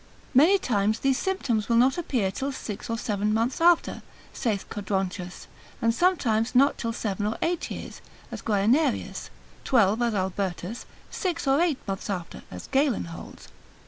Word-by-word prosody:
Many 320 +10 +6
times 215 - +1
these 270 -1 +2
symptoms 250 - -1
will 235 - +3
not 255 +3 +5
appear 250 - -1
till 270 +8 -3
six 220 -6 -6
or 230 - -1
seven 210 -2 -1
months 235 +7 0
after, 345 0 +3 0.3
saith 220 -7 -2
Codronchus; 190 -3 -3 0.3
and 230 0 +2
sometimes 245 -9 +1
not 275 +3 +4
till 230 - -1
seven 205 -3 -2
or 220 - -2
eight 345 0 -1
years, - - -7 0.3
as - - -6
Guianerius; 230 +7 +1 0.3
twelve 225 -3 +3
as 235 -2 +1
Albertus; 190 +2 -3 0.2
six 355 -5 -2
or 270 +4 +4
eight 335 -6 +2
months 195 +1 -4
after, 180 -4 -4
as 90 - -8
Galen 270 -3 +1
holds. - - -11
230 Hz, 155 wpm, -26 LUFS, 200-275 Hz, 0.3 s, Many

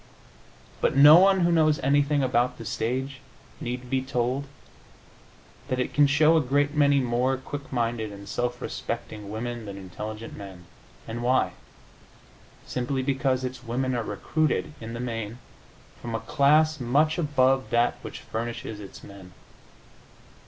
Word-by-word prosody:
But - - +2
no 145 +4 +9
one 190 0 +5
who 175 0 +3
knows 155 -2 +4
anything 145 +1 +2
about 125 0 +1
the 115 - -9
stage 130 +5 -2 0.4
need 125 +1 -5
be 130 +1 0
told 130 +1 -1 1.2
that 130 -3 -1
it 125 - -2
can 145 -1 +5
show 150 +3 +4
a 160 - +4
great 145 +2 +1
many 145 -2 +4
more 125 +1 +1
quick 140 +2 -8
minded 115 -3 -1
and 100 0 -10
self 120 +3 -2
respecting 105 -2 -5
women 115 +1 -5
than 100 -1 -7
intelligent 105 +4 -7
men. 95 -3 -10 0.4
And 115 +1 -5
why? 130 +2 +2 1.1
Simply 130 +1 -2
because 135 -1 0
its 130 -1 -5
women 130 +2 -1
are 120 - 0
recruited, 150 +9 -1
in 115 0 -6
the - - -5
main, 115 -2 -4 0.6
from 115 -1 -4
a - - -1
class 155 +4 +3
much 145 +7 +2
above 135 -4 +2
that 120 +1 +1
which - - -8
furnishes 115 -1 -5
its 100 -2 -11
men. 95 -2 -12
125 Hz, 145 wpm, -26 LUFS, 115-140 Hz, 1.2 s, no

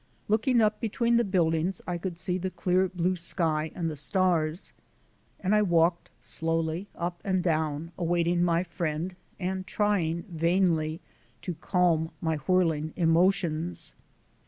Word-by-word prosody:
Looking 225 +3 +3
up 215 -1 +2
between 235 +1 +1
the 235 - +3
buildings 175 -2 +1
I 175 -1 -3
could 175 -1 -4
see 180 +1 0
the 190 +1 -2
clear 185 0 +1
blue 180 +1 0
sky 160 -2 -1
and 170 -2 -2
the 155 - -3
stars. 170 +1 0 0.7
And 195 +2 0
I 210 - +5
walked 170 -2 +2
slowly 165 +3 -2
up 175 0 -4
and 185 -3 0
down 160 -1 -1
awaiting 175 0 +1
my 170 0 +2
friend 170 0 -3 0.2
and 185 0 -3
trying, 175 -6 0
vainly 165 -3 +1 0.4
to 180 - -3
calm 170 -2 +1
my 160 -1 -1
whirling 160 -1 +1
emotions. 170 -1 +1
175 Hz, 135 wpm, -28 LUFS, 165-185 Hz, 0.7 s, I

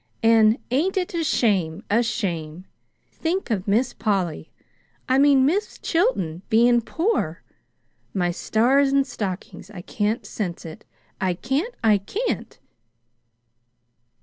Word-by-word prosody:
An' 225 0 +5
ain't 340 +10 +1
it 360 -1 -1
a 335 -1 -1
shame, 195 - +1
a 220 +4 +3
shame! 185 -8 -3 0.5
Think 345 -2 -2
of 200 -3 -1
Miss 240 +5 +1
Polly 185 -7 -2 0.6
I 260 +1 +3
mean, 275 -2 +5
Mis' 395 +9 0
Chilton 325 - 0
bein' 240 +2 +4
poor! 350 - -1 0.7
My 180 -3 0
stars 260 +9 +2
and 275 0 +3
stockings, 190 -3 -6
I 195 -4 -9
can't 210 +4 -2
sense 180 -6 -5
it 160 -1 -10 0.4
I 185 -2 +1
can't, 280 - -2
I 215 -2 +4
can't!" 415 - -4
225 Hz, 120 wpm, -23 LUFS, 190-275 Hz, 0.7 s, An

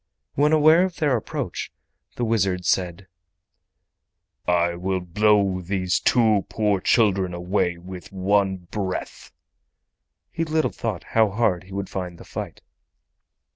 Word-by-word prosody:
When 145 +2 +2
aware 155 +3 +6
of 185 -2 -2
their 150 -7 +1
approach, 115 - -4 0.4
the 120 - -1
wizard 95 -5 0
said: 90 0 0 1.4
"I 85 -1 +2
will 95 +2 -2
blow 100 +1 +2
these 90 0 -1
two 110 -5 +3
poor 105 -3 +1
children 95 -5 +2
away 90 0 -1
with 90 +1 -10
one 95 0 +1
breath." 95 -3 -4 1.0
(He 165 - -2
little 160 0 0
thought 110 -7 -4
how 110 -2 +2
hard 100 -4 0
he 95 - -16
would 100 -1 -3
find 90 -2 -5
the - - -13
fight.) - - -7
95 Hz, 130 wpm, -23 LUFS, 90-110 Hz, 1.4 s, aware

